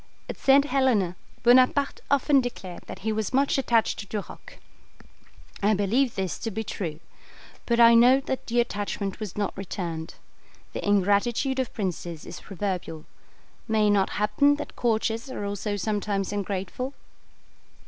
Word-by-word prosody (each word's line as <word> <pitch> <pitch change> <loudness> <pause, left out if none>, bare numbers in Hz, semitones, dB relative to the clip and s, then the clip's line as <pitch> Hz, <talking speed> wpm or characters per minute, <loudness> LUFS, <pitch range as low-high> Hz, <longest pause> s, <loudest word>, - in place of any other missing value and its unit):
At - - -6
St. 275 +1 +5
Helena 250 -11 +2 0.3
Bonaparte 255 +3 +4
often 280 0 +4
declared 190 -8 -6
that 190 - -9
he 220 - +1
was 220 +2 -2
much 275 0 +2
attached 230 -4 +1
to 200 - -7
Duroc. 210 -1 -7 1.0
I 210 +1 +3
believe 230 +6 +1
this 190 -5 -3
to 225 - -3
be 220 +1 -4
true; 165 -7 -5 0.7
but 235 0 +2
I 235 0 +8
know 245 +3 +6
that 265 -1 -4
the 240 +1 +1
attachment 205 -4 -2
was 210 -4 -6
not 205 -2 -1
returned. 170 -4 -5 0.6
The - - -4
ingratitude 205 +7 +2
of 260 - -1
princes 175 -5 -4
is - - -8
proverbial. 185 -5 -4 0.6
May 220 -1 +2
it 205 - +4
not 200 -2 +2
happen 210 +8 +3
that 295 - -7
courtiers 225 +1 0
are 205 - -5
also 205 +1 -3
sometimes 205 -1 -2
ungrateful? 205 +6 -3
215 Hz, 150 wpm, -26 LUFS, 195-245 Hz, 1.0 s, I